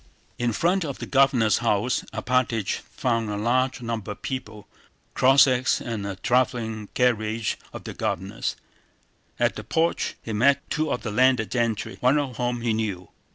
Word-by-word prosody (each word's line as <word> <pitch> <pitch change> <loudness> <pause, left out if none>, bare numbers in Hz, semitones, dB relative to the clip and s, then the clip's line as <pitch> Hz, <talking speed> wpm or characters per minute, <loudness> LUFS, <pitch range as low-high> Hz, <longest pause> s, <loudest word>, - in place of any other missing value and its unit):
In 120 -1 +1
front 175 - +1
of 140 -4 -4
the - - -6
Governor's 135 -6 +3
house 115 +1 +1
Alpátych 125 -5 0
found 115 -3 -2
a 105 - -2
large 125 +4 0
number 115 -3 -3
of - - -22
people, 110 -6 -5 0.5
Cossacks, 130 -1 +4
and 110 -5 -4
a 100 - -4
traveling 110 -1 0
carriage 110 -3 +1 0.2
of - - -8
the - - -6
Governor's. - - -3 0.8
At - - +1
the - - -6
porch 165 +1 0
he 115 - -5
met 140 +7 +3
two 155 -2 0
of - - -2
the 110 - -3
landed 125 -1 +3
gentry, 115 -4 -1
one 130 +4 +3
of 135 -5 -2
whom 120 -1 -1
he 115 -1 +1
knew. 100 -5 -3
120 Hz, 160 wpm, -25 LUFS, 110-130 Hz, 0.8 s, Cossacks